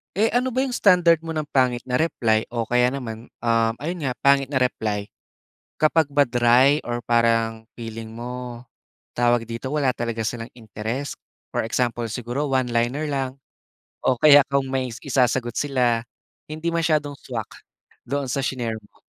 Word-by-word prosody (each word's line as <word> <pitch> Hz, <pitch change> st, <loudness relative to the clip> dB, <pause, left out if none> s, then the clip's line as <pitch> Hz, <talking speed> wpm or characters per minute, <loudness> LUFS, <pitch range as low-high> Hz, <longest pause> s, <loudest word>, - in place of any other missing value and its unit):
Eh 215 Hz, +4 st, +3 dB
ano 250 Hz, +2 st, 0 dB
ba 260 Hz, -, +1 dB
yung 270 Hz, -, -1 dB
standard 170 Hz, -4 st, +4 dB
mo 165 Hz, -, -4 dB
ng 155 Hz, -2 st, -3 dB
pangit 125 Hz, -2 st, +2 dB
na 125 Hz, -, +2 dB
reply 115 Hz, -8 st, +1 dB
o 115 Hz, -2 st, -2 dB
kaya 125 Hz, +1 st, +3 dB
naman, 115 Hz, -4 st, -7 dB
ah, 115 Hz, -1 st, +2 dB
ayun 165 Hz, 0 st, -3 dB
nga 130 Hz, -, 0 dB
pangit 140 Hz, 0 st, +4 dB
na 130 Hz, -1 st, -1 dB
reply? 105 Hz, -5 st, -1 dB, 0.7 s
Kapag 155 Hz, -1 st, +3 dB
ba 145 Hz, 0 st, +3 dB
dry 125 Hz, +4 st, +4 dB
or 120 Hz, 0 st, -3 dB
parang 115 Hz, -1 st, +1 dB
feeling 115 Hz, -1 st, -7 dB
mo, 120 Hz, +1 st, -7 dB, 0.5 s
tawag 120 Hz, -1 st, +2 dB
dito, 115 Hz, +3 st, -5 dB
wala 140 Hz, -3 st, +1 dB
talaga 115 Hz, -2 st, -3 dB
silang 115 Hz, +1 st, -4 dB
interest? 110 Hz, +5 st, -5 dB, 0.4 s
For -, -, +1 dB
example, 120 Hz, 0 st, -1 dB
siguro 125 Hz, +5 st, -3 dB
one-liner 125 Hz, +2 st, 0 dB
lang 135 Hz, -2 st, -2 dB, 0.7 s
o 130 Hz, -, +2 dB
kaya 145 Hz, +2 st, +8 dB
kung 140 Hz, -1 st, +1 dB
may 130 Hz, -1 st, -1 dB
is 115 Hz, -, -8 dB
isasagot 125 Hz, -3 st, +1 dB
sila, 125 Hz, -5 st, +1 dB, 0.5 s
hindi 155 Hz, +2 st, -3 dB
masyadong 155 Hz, -3 st, +1 dB
swak 115 Hz, -6 st, -7 dB, 0.5 s
doon 140 Hz, -1 st, -2 dB
sa 135 Hz, -, -1 dB
shi-nare 120 Hz, -4 st, -2 dB, 0.2 s
mo. -, -, -28 dB
125 Hz, 160 wpm, -23 LUFS, 115-145 Hz, 0.7 s, kaya